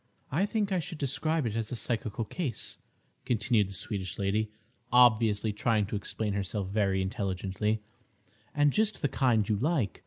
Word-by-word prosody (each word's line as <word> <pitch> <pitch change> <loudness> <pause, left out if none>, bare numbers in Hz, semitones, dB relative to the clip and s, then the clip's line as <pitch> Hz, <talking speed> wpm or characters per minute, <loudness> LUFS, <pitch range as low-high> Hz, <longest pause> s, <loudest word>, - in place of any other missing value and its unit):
"I 180 +9 +2
think 205 -2 0
I 185 - +2
should 170 0 -5
describe 150 +2 0
it 110 -2 -2
as 115 -1 -2
a - - -2
psychical 115 -2 -2
case," 135 - -4 0.4
continued 115 -3 +2
the - - -8
Swedish 95 -3 -4
lady, 105 +2 0 0.4
obviously 110 -3 +5
trying 105 0 +2
to 100 - -4
explain 105 +1 -2
herself 100 0 -2
very 95 -2 +1
intelligently, 100 +1 -1 0.7
"and 145 -1 +4
just 215 -4 +1
the - - +4
kind 125 -6 +2
you 105 -2 +1
like. 135 - 0
110 Hz, 160 wpm, -30 LUFS, 100-135 Hz, 0.7 s, obviously